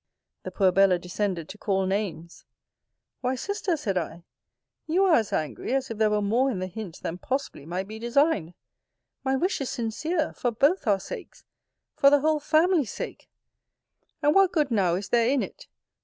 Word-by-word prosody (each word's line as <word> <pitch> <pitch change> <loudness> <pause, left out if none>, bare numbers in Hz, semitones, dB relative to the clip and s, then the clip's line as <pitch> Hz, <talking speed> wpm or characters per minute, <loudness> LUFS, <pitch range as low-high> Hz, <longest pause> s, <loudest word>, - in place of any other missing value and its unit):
The - - -6
poor 190 -3 +3
Bella 195 -1 +4
descended 180 -1 -3
to 210 - -10
call 195 -2 0
names. 185 -4 -3 0.8
Why, 255 +1 -1
Sister, 385 +3 -2
said 195 -10 -1
I, 170 0 -7 0.6
you 360 +5 +3
are 365 - +4
as 225 -9 +2
angry, 155 - -2
as 265 -3 -1
if 225 - -6
there 215 -1 +4
were 210 0 +1
more 240 +7 +2
in 235 - -2
the 185 - -2
hint 185 -2 -8
than 175 +2 -4
possibly 260 - -4
might 185 +3 -3
be 215 +1 -8
designed. 235 - +1 0.7
My 265 0 +1
wish 355 +4 0
is 270 - -2
sincere, 305 +8 -2
for 245 - -1
both 280 - +2
our 200 -2 +3
sakes! - - -9 0.5
for 275 - +6
the 285 0 +4
whole 310 +1 +2
family's 310 - +2
sake! - - -7 0.9
And 295 - +4
what 390 0 +5
(good 300 -6 +1
now) 190 -6 +2
is 195 +2 -4
there 235 0 +3
in 275 -1 +2
it? - - -10
230 Hz, 185 wpm, -26 LUFS, 190-290 Hz, 0.9 s, for